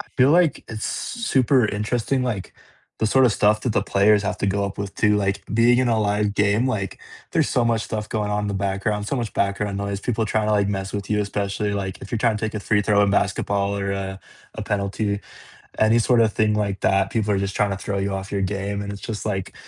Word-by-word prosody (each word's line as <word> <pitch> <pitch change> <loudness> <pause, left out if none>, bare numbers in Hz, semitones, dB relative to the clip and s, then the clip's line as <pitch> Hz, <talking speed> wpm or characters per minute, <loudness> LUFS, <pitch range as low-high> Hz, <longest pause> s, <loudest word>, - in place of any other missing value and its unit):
I - - -8
feel 130 +1 +5
like 170 -1 +4
it's 110 -1 -4
s 235 -1 -4
super 130 - +3
interesting, 115 +5 -1
like, 110 -7 -3 0.4
the 110 - +1
sorta 130 +2 +4
stuff 105 +1 +2
that 125 - 0
the - - +1
players 100 +1 +3
have 105 - -2
to - - -1
go 100 +1 0
up 100 - -4
with 100 -1 -4
too. 105 -1 +3
Like, 100 -1 -1
being 120 +2 +4
in 130 - +2
a 115 -2 +2
live 105 0 0
game, 105 +5 +2
like, 100 -7 -3 0.3
there's - - +2
so 120 - +1
much 115 -1 +1
stuff 105 -1 -4
going 105 -2 -2
on 105 0 -1
in 105 - -2
the 100 - -2
background, 100 +2 -1
so 140 - -1
much 115 -4 -3
background 100 0 -1
noise, 100 -1 -3
people 115 0 -1
trying 110 0 0
to, 110 - +1
like, 100 -1 +2
mess 95 -1 -3
with 100 0 -5
you. 105 -1 +2
Especially, 100 0 -2
like, 95 -2 -4
if 100 - -10
you're 115 - 0
trying 115 -2 +2
to - - -6
take 110 - -3
a 105 - -3
free 105 0 +1
throw 105 -1 +3
in 100 - +2
basketball 100 0 0
or, 100 0 -2
uh, 95 0 -4 0.4
a - - -5
penalty, 100 0 -1 0.6
any 110 +2 +4
sorta 115 -1 +4
thing 110 0 +1
like 100 -2 -1
that, 95 0 +2
people 105 -2 0
are 100 - +2
just 100 0 -3
trying 105 -1 +1
to 95 - -2
throw 100 +1 -3
you 100 0 -1
off 95 0 -5
your 100 - -1
game. 100 +1 -2
And 100 - -5
it's 100 - -8
just 110 -3 -5
like, 95 -3 -3
105 Hz, 250 wpm, -23 LUFS, 100-110 Hz, 0.6 s, feel